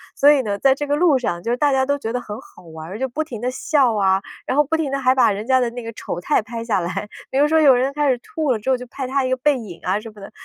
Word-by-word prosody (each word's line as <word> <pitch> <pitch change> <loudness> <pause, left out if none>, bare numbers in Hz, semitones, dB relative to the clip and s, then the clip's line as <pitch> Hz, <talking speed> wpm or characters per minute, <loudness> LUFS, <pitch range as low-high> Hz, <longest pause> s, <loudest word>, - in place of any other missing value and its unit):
所 285 +1 +6
以 285 - +3
呢， 205 -2 -2
在 270 +4 +4
这 290 +1 -4
个 290 - +1
路 305 -3 +4
上， 175 -8 -3
就 230 - -1
是 245 - 0
大 290 +1 +2
家 265 0 +2
都 285 +1 0
觉 225 -4 -4
得 250 - -1
很 210 -2 -7
好 - - -18
玩 160 -1 -10
儿， 195 - -6
就 265 - -1
不 280 +6 -3
停 245 -8 -8
地 250 +1 -1
笑 260 -3 +1
啊， 190 -2 +2 0.2
然 255 - -1
后 295 - +6
不 300 +3 -1
停 315 -3 -1
地 275 - 0
还 255 -1 +3
把 260 -5 +4
人 205 +2 -5
家 260 +1 +3
的 245 -2 0
那 245 0 -7
个 230 - -6
丑 175 - -5
态 180 - +1
拍 230 +1 -6
下 215 -5 0
来。 190 +4 -4 0.2
比 265 - -2
如 290 - +4
说 320 - +4
有 275 -3 +7
人 265 +3 0
开 295 -1 +1
始 255 - +2
吐 315 - -2
了 225 - -3
之 215 - -4
后 260 - +3
就 250 - -9
拍 265 +2 -6
他 270 +1 0
一 255 - -1
个 260 - +2
背 285 +2 +2
影 205 -8 -9
啊 190 +3 0
什 225 - -9
么 210 - -15
的， 195 - -10
255 Hz, 370 characters per minute, -21 LUFS, 210-280 Hz, 0.2 s, 有